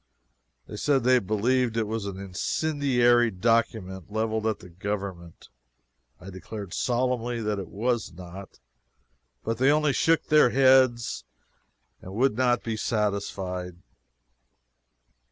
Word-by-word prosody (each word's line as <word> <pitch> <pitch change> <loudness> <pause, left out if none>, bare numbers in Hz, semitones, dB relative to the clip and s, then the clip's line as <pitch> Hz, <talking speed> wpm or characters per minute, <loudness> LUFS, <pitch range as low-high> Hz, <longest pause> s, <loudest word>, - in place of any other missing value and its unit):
They 105 - -9
said 135 +1 +1
they 130 +1 +5
believed 115 +3 0
it 115 - +1
was 110 -1 -4
an 95 -1 -6
incendiary 120 - +1
document, 100 -3 -1
leveled 110 0 -1
at 110 - 0
the 90 - -14
government. 95 -2 -6 0.7
I 95 +2 -10
declared 95 0 -8
solemnly 120 -1 -1
that 105 -1 -1
it 95 - -6
was 115 +5 -2
not, 90 +1 -11 0.8
but 115 0 -3
they 130 +2 +4
only 150 -1 +3
shook 165 +3 +2
their 150 -5 +5
heads 130 -2 +3 0.8
and 95 +1 -9
would 130 0 +2
not 125 -1 +1
be 110 -1 -3
satisfied. 100 -5 -2
110 Hz, 120 wpm, -26 LUFS, 100-125 Hz, 0.8 s, they